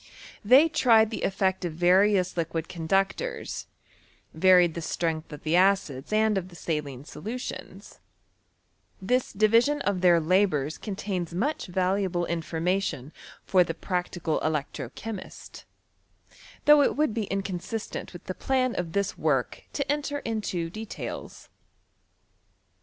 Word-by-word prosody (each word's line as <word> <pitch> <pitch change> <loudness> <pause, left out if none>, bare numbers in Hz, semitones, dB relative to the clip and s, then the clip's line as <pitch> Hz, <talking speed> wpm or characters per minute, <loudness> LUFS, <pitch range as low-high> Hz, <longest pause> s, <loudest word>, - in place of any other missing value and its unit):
They 260 +9 +7
tried 225 -7 +4
the 220 - -4
effect 190 -1 0
of 170 -3 -3
various 185 +3 +3
liquid 165 -1 -2
conductors, 195 - -2 0.7
varied 180 0 +5
the 170 - -5
strength 160 -1 -2
of 150 - -9
the 155 +2 +1
acids 180 -8 +2
and 215 -1 +3
of 180 - -8
the 175 - -14
saline 145 -5 -4
solutions* 225 +11 -7 1.0
This 250 +6 0
division 230 +8 +3
of 195 -3 0
their 175 -2 +5
labours 160 -4 +1
contains 190 -4 -4
much 280 - -1
valuable 185 -1 0
information 165 -3 -2 0.3
for 185 -2 +4
the 165 - -5
practical 180 -3 -2
electro 150 -4 -2
chemist, 210 - -9 1.0
though 295 0 +8
it - - +2
would 300 -7 +2
be 220 -2 -1
inconsistent 195 +2 -4
with 175 - -11
the 185 - -5
plan 255 +3 0
of 170 -2 -4
this 200 -1 -1
work 135 -6 0
to 280 -1 -1
enter 290 0 -2
into 190 -7 -2
details. 220 +3 -7
185 Hz, 125 wpm, -27 LUFS, 165-215 Hz, 1.0 s, though